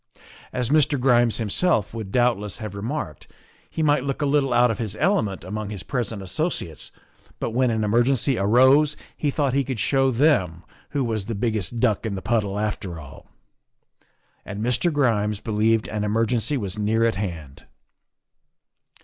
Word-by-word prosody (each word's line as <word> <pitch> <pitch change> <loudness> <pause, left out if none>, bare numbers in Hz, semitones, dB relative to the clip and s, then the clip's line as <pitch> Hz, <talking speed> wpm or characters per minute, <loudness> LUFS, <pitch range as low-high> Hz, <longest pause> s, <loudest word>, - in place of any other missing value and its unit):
As 125 -2 -2
Mr. 150 -2 +3
Grimes 120 -3 +3
himself 110 - +2
would 110 -4 -6
doubtless 110 -4 +1
have 110 -3 -6
remarked, 100 - -5 0.4
he 160 - -2
might 145 -3 +3
look 140 -1 -3
a 145 - 0
little 140 -2 +2
out 120 0 +4
of 110 - -5
his 110 -5 -3
element 110 - 0
among 105 +3 -5
his 100 -3 -7
present 115 -6 -3
associates, 95 - -4 0.5
but - - -2
when 125 +2 +2
an 110 -1 0
emergency 120 +5 +2
arose 130 +9 +4 0.2
he 150 - -1
thought 140 -2 0
he 140 0 +2
could 130 -3 -4
show 135 +2 +2
them 115 - +1 0.3
who 140 -2 -1
was 110 -4 -2
the 115 - -3
biggest 110 -1 -2
duck 110 -4 +1
in 110 -3 -3
the 95 - -5
puddle 105 -4 0
after 100 -5 -3
all. 70 -3 -13 1.2
And 100 +2 -6
Mr. 125 +8 +1
Grimes 110 -8 +1
believed 110 0 +1
an 105 -1 -3
emergency 115 +6 0
was 100 -3 -4
near 110 +2 +2
at 115 - +2
hand. 80 -9 -6
115 Hz, 165 wpm, -23 LUFS, 105-130 Hz, 1.2 s, out